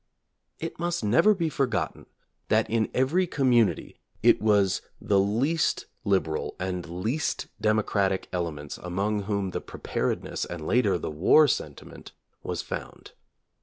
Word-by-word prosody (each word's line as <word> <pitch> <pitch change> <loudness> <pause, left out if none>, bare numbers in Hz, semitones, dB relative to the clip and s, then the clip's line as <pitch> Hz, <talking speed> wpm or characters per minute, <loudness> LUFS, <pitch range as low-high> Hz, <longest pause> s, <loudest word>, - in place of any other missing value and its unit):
It 165 0 -6
must 175 -4 -1
never 120 - +4
be 170 -3 0
forgotten 135 - -2 0.4
that 110 +1 +2
in 110 -1 0
every 160 +9 +2
community 125 - +1 0.2
it - - +5
was 105 -3 +3 0.2
the 100 -1 +2
least 125 +12 +1 0.2
liberal 95 -7 0
and 90 -2 -3
least 135 +8 -1 0.2
democratic 100 -3 +1
elements 80 -5 -4
among 100 +3 -2
whom 100 -2 -1
the - - -3
preparedness - - -3
and 85 -3 -6
later 105 -5 +2
the 80 - -4
war 95 - +5
sentiment - - -5 0.3
was - - -4
found. - - -7
105 Hz, 130 wpm, -27 LUFS, 95-130 Hz, 0.4 s, it